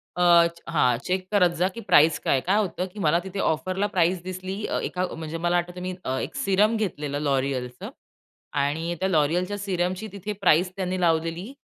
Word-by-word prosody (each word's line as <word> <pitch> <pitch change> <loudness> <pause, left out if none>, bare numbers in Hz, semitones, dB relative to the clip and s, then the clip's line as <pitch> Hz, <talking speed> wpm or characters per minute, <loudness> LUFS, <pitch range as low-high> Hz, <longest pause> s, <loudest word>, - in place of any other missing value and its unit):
अ, 180 - +1 0.2
च 170 0 -13
हां, 125 -7 +2
चेक 185 0 -1
करत 185 -4 +4
जा 180 - +3
की 230 - -6
प्राईस 160 -3 +5
काय - - -1
आहे. 130 - +2
काय 200 - +3
होतं 185 -3 -1
की 210 - -9
मला 165 -1 +3
तिथे 190 +1 -6
ऑफरला 185 +5 0
प्राईस 180 -2 +1
दिसली 185 +2 -5
अ, - - -1
एका 180 - -2
अ, - - -9
म्हणजे 160 0 -5
मला 175 +1 +1
आठवतंय 180 +1 -4
मी 185 0 -3
अ, 130 0 -2
एक - - -5
सीरम 205 +3 +2
घेतलेलं 150 -9 -3
L'Oréalचं. 130 -3 -2 0.6
आणि 155 +4 -1
त्या 190 - 0
L'Oréalच्या 175 +4 +1
सीरमची 185 0 -2
तिथे 200 +1 -5
प्राईस 180 0 +4
त्यांनी 185 -1 -2
लावलेली 165 +6 0
180 Hz, 195 wpm, -25 LUFS, 160-190 Hz, 0.6 s, प्राईस